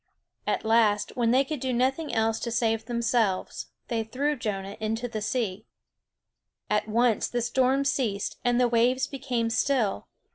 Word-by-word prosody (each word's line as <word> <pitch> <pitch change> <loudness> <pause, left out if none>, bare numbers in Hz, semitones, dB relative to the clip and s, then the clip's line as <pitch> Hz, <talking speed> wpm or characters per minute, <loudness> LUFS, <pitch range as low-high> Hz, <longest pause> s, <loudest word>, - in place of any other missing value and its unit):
At - - -1
last, 220 -2 +2
when 235 -2 +1
they 260 +3 +4
could 300 +1 -4
do 260 +1 -2
nothing 265 +6 0
else 225 0 +1
to 235 - -3
save 225 -1 0
themselves, 235 -4 0 0.2
they 230 -2 -1
threw 280 +7 -1
Jonah 200 -5 -4
into 225 +2 -2
the 220 -2 -5
sea. 215 -3 -2 1.0
At 210 0 +1
once 230 +1 +2
the 245 - -2
storm 260 +3 +2
ceased, 220 -8 -1
and 245 0 +2
the 250 - +4
waves 240 +2 +2
became 245 -4 -2
still. 225 - 0
235 Hz, 155 wpm, -27 LUFS, 220-255 Hz, 1.0 s, they